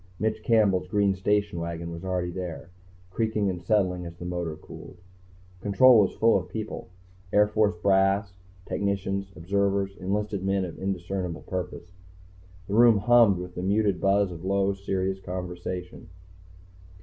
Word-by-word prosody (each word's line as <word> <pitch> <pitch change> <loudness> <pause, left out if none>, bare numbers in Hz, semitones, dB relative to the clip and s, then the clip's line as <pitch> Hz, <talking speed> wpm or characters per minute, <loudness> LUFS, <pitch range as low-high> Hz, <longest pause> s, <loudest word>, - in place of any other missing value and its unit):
Mitch 110 +1 -1
Campbell's 105 -6 +2
green 100 +1 +2
station 100 -1 0
wagon 85 0 -5
was 85 +1 -8
already 90 -2 -2
there, 90 -1 -6 0.4
creaking 110 -1 0
and 90 -2 -6
settling 90 -2 +1
as 85 0 -9
the 90 - -8
motor 90 -3 -3
cooled. 85 +3 -12 0.6
Control 115 +4 +6
was 100 - +2
full 115 -2 +4
of 90 0 -10
people; 110 -1 -6 0.4
Air 105 0 +5
Force 105 -2 +1
brass, 95 0 +2 0.3
technicians, 100 -1 -2
observers, 100 +2 0
enlisted 100 +1 -2
men 95 0 +1
of 85 - -9
indiscernible 95 -2 -3
purpose. 90 -1 -5 0.8
The 100 - -4
room 115 0 +6
hummed 115 -2 +5
with 90 0 -7
the 90 - -5
muted 100 0 +1
buzz 100 -1 +2
of 85 -1 -9
low, 100 +1 +1
serious 95 -1 -2
conversation. 90 -1 -6
95 Hz, 145 wpm, -26 LUFS, 90-100 Hz, 0.8 s, Control